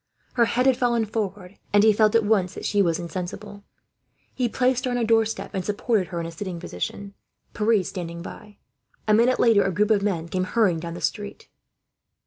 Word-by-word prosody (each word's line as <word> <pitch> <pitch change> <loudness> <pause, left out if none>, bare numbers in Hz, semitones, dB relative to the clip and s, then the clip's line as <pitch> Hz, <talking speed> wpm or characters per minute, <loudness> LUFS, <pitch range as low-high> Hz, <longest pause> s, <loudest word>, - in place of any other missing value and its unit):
Her 240 -2 +4
head 250 +2 0
had 265 -2 +4
fallen 235 -2 +1
forward, 200 -3 -5
and 205 0 +5
he 220 -1 +6
felt 215 +1 +3
at 225 -2 +4
once 200 -4 +1
that - - -7
she 205 - +2
was 170 -4 +1
insensible. 185 +4 -7 0.7
He 250 -2 -1
placed 255 +1 +1
her - - 0
on 245 - -1
a 240 - 0
doorstep, 225 0 +1
and 190 - -2
supported 210 0 0
her 175 - -5
in 165 - -3
a 165 - -6
sitting 175 +1 -6
position, 195 - -6 0.4
Pierre 215 -2 +2
standing 170 -2 -6
by. 210 +2 -11 0.5
A 215 - +4
minute 235 +4 +3
later 225 -4 +5
a 195 - 0
group 210 +4 +1
of 205 -2 +3
men 180 -5 -1
came 185 +2 -1
hurrying 185 -5 +1
down 170 +1 -6
the - - -8
street. 205 -2 -4
205 Hz, 205 wpm, -24 LUFS, 185-225 Hz, 0.7 s, he